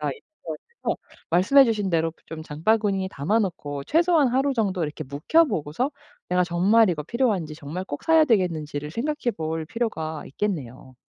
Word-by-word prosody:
제가 - - -1
있어 - - -11 0.7
가지고 - - -1 0.3
말씀해 205 +12 +6
주신 215 -5 0
대로 165 -1 +1
좀 160 -1 -7
장바구니에 195 +5 0
담아 170 +11 0
놓고 145 -8 -3
최소한 330 - +3
하루 270 +3 +1
정도 200 -6 0
이렇게 155 +1 -5
묵혀 145 - +3
보고서 205 - -2 0.4
'내가 180 0 +3
정말 190 +5 +4
이거 155 -3 -2
필요한지, 195 - -1
정말 160 +5 -6
꼭 145 -5 -6
사야 320 -1 +6
되겠는지.'를 160 - 0
생각해 250 - -2
볼 160 0 -3
필요가 160 -8 -3
있겠네요. 130 - -4
180 Hz, 380 characters per minute, -24 LUFS, 155-230 Hz, 0.7 s, 말씀해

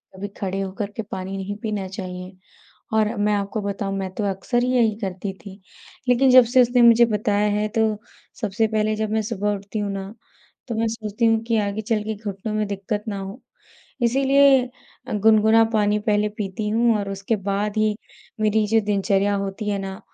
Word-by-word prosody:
कभी 200 +2 -5
खड़े 195 0 -2
होकर 195 +2 -4
के 225 - -2
पानी 190 +1 -4
नहीं 195 +1 -4
पीना 210 -3 -2
चाहिए 185 -1 -7 0.6
और 220 +1 +2
मैं 210 0 +1
आपको 200 +2 -2
बताऊँ, 200 -1 -3
मैं 190 -1 -3
तो 210 - -2
अक्सर 240 +6 -1
ही 250 - 0
यही 225 -3 +3
करती 190 -1 -4
थी। 195 0 -11 0.5
लेकिन 255 +2 +4
जब 255 -1 +8
से 255 - +8
उसने 245 0 +3
मुझे 235 0 +7
बताया 210 -1 +1
है, 215 - 0
तो 220 -1 +1 0.4
सबसे 215 +1 0
पहले, 215 0 0
जब 215 0 -2
मैं 220 0 +1
सुबह 205 -1 -1
उठती 200 +2 -6
हूँ 205 -1 -2
ना, 195 +1 -6 0.5
तो 230 - -3
मैं 225 +1 0
सोचती 220 0 -3
हूँ 225 0 +3
कि 230 -1 0
आगे 205 +1 -2
चल 215 0 0
के 220 - -3
घुटनों 205 0 -5
में 215 -1 0
दिक्कत 205 +1 -3
ना 200 -2 -3
हो। 195 +6 -8 0.6
इसीलिए 270 +2 +5 0.5
अ, - - -4
गुनगुना 220 +1 +5
पानी 210 -1 +2
पहले 210 0 +2
पीती 210 +1 -3
हूँ 230 +1 +3
और 200 -1 -3
उसके 195 +3 -2
बाद 205 +2 -1
ही 215 -1 +2 0.5
मेरी 215 0 +2
जो 225 0 +4
दिनचर्या 200 0 +1
होती 200 +2 -4
है 200 - 0
ना, 195 0 -6
210 Hz, 195 wpm, -22 LUFS, 200-225 Hz, 0.6 s, जब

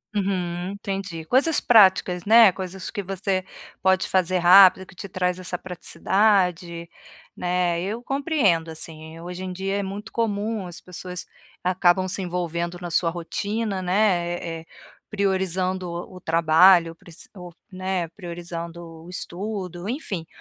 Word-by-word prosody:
Uhum, 185 -2 -2
entendi, 195 -5 -5
coisas 285 - +3
práticas, 190 -5 +4
né, 225 -1 +7
coisas 185 +1 -6
que 205 - -3
você 190 0 -2 0.4
pode 190 0 +2
fazer 185 -1 +1
rápido, 185 +1 +7
que - - -16
te 195 +2 -9
traz 180 0 -1
essa 180 -1 -3
praticidade, 180 -2 0 0.5
né. 175 -1 0
Eu 220 +6 -4
compreendo, 270 - +1
assim. 160 0 -7
Hoje 180 +2 -7
em 185 - -4
dia, 195 +2 -2
é 200 - -1
muito 200 +3 -7
comum, 215 -3 -2
as 175 - -8
pessoas 180 0 -7 0.4
acabam 185 0 +2
se 190 +1 -2
envolvendo 175 -1 -3
na 175 -2 -6
sua 165 0 +2
rotina, 200 +4 -3
né, 180 -2 +1
eh 165 -1 -5
eh, - - -18 0.4
priorizando 190 -2 -1
o 175 +2 -7
o - - -13
trabalho, 165 +1 +5
prec 170 -2 -15 0.2
ou, 180 -3 -10 0.2
né, 185 -2 -2
priorizando 170 -1 -7 0.2
o - - -12
estudo, 185 0 -5
enfim, 195 - -4
185 Hz, 140 wpm, -24 LUFS, 175-195 Hz, 0.5 s, né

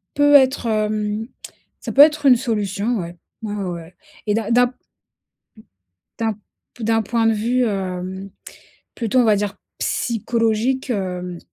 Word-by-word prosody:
peut 290 0 +5
être, 265 -2 +4
hem, 215 0 -1 0.6
ça - - -5
peut 280 - +7
être 300 0 +5
une 255 - +8
solution 220 -1 -1
ouais. 170 0 -6 0.3
Ouais, 210 - -3
ouais, 195 -3 -3
ouais 170 +1 -9 0.3
et 210 - +2
d'un 225 0 -2
d'un 245 +1 +5
p 250 - -12
m - - -41 1.4
d'un 225 -1 +1 0.4
p 235 - -7
d'un 225 0 +2
point 230 +2 0
de 225 - +4
vue, 240 +4 +1
hem, 190 -2 -4 0.6
plutôt 235 +1 0
on 245 - +4
va 215 -2 +4
dire 205 0 -2 0.2
psychologique, 230 +2 0
hem, 180 -4 -3
220 Hz, 155 wpm, -20 LUFS, 200-245 Hz, 1.4 s, une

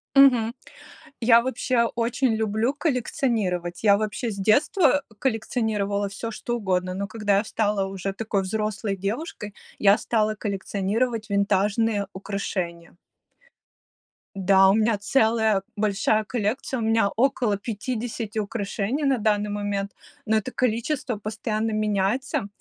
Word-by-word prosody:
Мгм. 245 -4 +6 0.7
Я 230 0 +6
вообще 250 -1 +1
очень 235 +1 +1
люблю 220 +4 0
коллекционировать. 225 - -1
Я 200 -2 +6
вообще 215 +2 -2
с 200 - -7
детства, 280 - +3
э, 220 - -19
коллекционировала 215 -4 -1
всё, 225 +3 -5
что 240 +2 -3
угодно, 185 -4 -1
но 200 +1 -3
когда 205 -2 +1
я 205 - +2
стала 210 -2 0
уже 195 0 -4
такой 205 -1 -1
взрослой 210 0 -2
девушкой, 210 - -4 0.3
я 200 +1 +5
стала 215 -2 0
коллекционировать 210 +3 -2
винтажные 200 +1 +1
украшения. 185 -4 -4 1.4
Да, 195 0 +5
у - - +5
меня 220 0 +2
целая 220 -1 +2
большая 210 +1 +1
коллекция, 240 +4 -2
у - - -2
меня 225 -2 +3
около 245 -4 +2
50 225 +1 -4
украшений 210 +5 -2
на 275 -2 +3
данный 210 -1 +1
момент, 205 -1 -2 0.3
но 220 0 +2
это 215 +4 -3
количество 250 +1 -1
постоянно 215 +1 -2
меняется, 215 +5 0
215 Hz, 125 wpm, -24 LUFS, 200-235 Hz, 1.4 s, Мгм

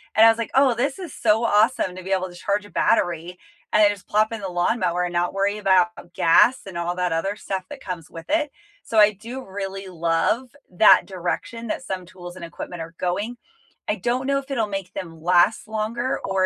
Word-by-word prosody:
and 220 +1 +7
I - - +9
was 225 - +3
like, 230 - -4
"Oh, 270 -2 +5
this 275 +8 -1
is 350 -7 -7
so 220 +1 +2
awesome 210 -4 +2
to 185 - -8
be 190 - -6
able 185 -1 0
to 175 - -13
charge 200 +3 -1
a - - -13
battery, 175 -4 0 0.3
and 215 - +6
then 205 - +7
just 200 -2 -9
plop 215 +2 +2
in 225 -2 -5
the 195 - -3
lawnmower 180 0 0
and 175 - -2
not 175 +1 0
worry 200 +1 0
about 180 -3 +1
gas, 235 +10 +4
and 180 -3 -7
all 175 +1 -2
that 180 -1 -1
other 195 +5 -1
stuff 190 -3 -4
that 290 -2 -9
comes 175 -4 -6
with 165 0 -10
it." 300 -2 +1 0.3
So 220 - +1
I 210 0 +7
do 235 +6 -8
really 195 0 -6
love 180 - 0
that 185 +4 +6
direction 190 +5 -4
that 260 - -3
some 185 -6 -5
tools 175 0 -11
and 170 - -7
equipment 165 +1 -7
are 165 +1 -12
going. 205 +7 -2 0.5
I - - +1
don't 250 +2 -1
know 275 0 +2
if 275 0 -11
it'll 230 -5 +1
make 195 -2 -5
them 165 -3 -7
last 180 +5 +3
longer, 225 +4 -2
or 190 -1 +1
195 Hz, 220 wpm, -23 LUFS, 175-225 Hz, 0.5 s, I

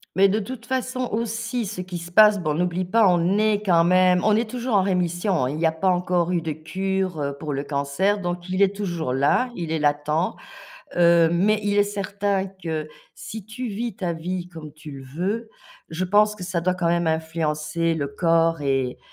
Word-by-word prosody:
Mais 195 +1 +5
de 210 - +1
toute 235 +2 -7
façon 255 -1 -2
aussi 230 +1 -2
ce 195 -2 -5
qui 180 -1 -6
se 170 +1 -9
passe 210 +1 +6
bon, 155 -3 -1
n'oublie 180 +2 -1
pas 220 +3 +4
on 180 +3 +2
est 215 -1 +2
quand 170 -3 +4
même 180 0 +4
on 215 -1 +4
est 230 +1 0
toujours 245 0 -2
en 195 - +4
rémission, 175 -4 0
il 145 +4 -4
y 165 - +1
a 160 - +4
pas 160 +4 -2
encore 180 -1 +1
eu 175 - +1
de 160 -1 -3
cure, 185 +2 -3
heu, 140 -1 -2
pour 150 -1 -4
le 140 0 -2
cancer 140 +8 0
donc 175 0 -4
il 185 +1 -1
est 200 0 +3
toujours 175 -9 -3
là 145 - +2
il 170 -3 -4
est 160 - 0
latent, 150 +3 0 0.6
heu, 170 -1 +5
mais 205 +5 +2
il 205 0 +1
est - - +7
certain 200 -1 -2
que 165 -5 -5 0.3
si 220 -2 -8
tu 240 +3 -5
vis 225 0 -4
ta 175 -3 -2
vie 175 +2 -4
comme 160 -3 -10
tu 155 0 -11
le 135 -1 -9
veux, 190 - -3 0.4
je 165 +3 -3
pense 210 +3 +3
que 185 - -7
ça 175 -1 -2
doit 180 +2 +1
quand 175 -2 -1
même 170 0 +1
influencer 160 0 -1
le 145 -3 -2
corps 165 +2 +1
et 135 -3 -1
180 Hz, 210 wpm, -23 LUFS, 160-205 Hz, 0.6 s, est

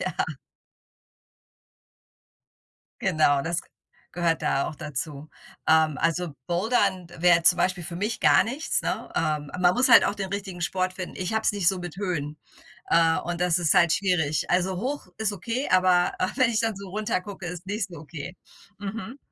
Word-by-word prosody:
Ja. 185 - -2 2.9
Genau, 145 -3 +2
das 170 +1 -2
g - - -25 0.4
gehört 170 -2 0
da 135 - +1
auch - - -5
dazu. 150 +1 -6 0.4
Ähm, 160 -2 +4
also, 165 -2 -1
Bouldern 190 0 +1
wäre 170 -1 +5
zum 175 - +5
Beispiel 185 -2 0
für 175 - -7
mich 210 +6 -2
gar - - +6
nichts, 270 +8 -2
ne? - - -3
Ähm, 150 -2 -1
man 175 0 +4
muss 255 +2 +3
halt 235 - +8
auch - - 0
den 195 -2 -5
richtigen 195 -3 -5
Sport 185 +2 -1
finden. 185 -1 -6
Ich 185 +4 -3
habe 220 - +1
es - - +2
nicht 200 -4 +2
so 190 - 0
mit 175 -1 -7
Höhen, 155 -7 -3 0.5
äh, 165 -1 +4
und 175 0 -4
das 180 -1 +2
ist 170 -4 +2
halt 170 -2 +5
schwierig. 170 -6 0
Also, 180 +1 +1
hoch 265 +2 -4
ist 220 -2 0
okay, 230 - -3
aber 185 -1 +4
aber 185 - 0
wenn 255 -3 +3
ich 220 - +1
dann 225 -1 0
so 195 0 -9
runter 210 -1 -1
gucke, 190 -2 -8
ist 175 +1 -7
nicht 205 +1 -2
so 170 -4 -10
okay. 160 +3 -8 0.4
Mhm. 220 +5 -6
180 Hz, 180 wpm, -25 LUFS, 165-200 Hz, 2.9 s, halt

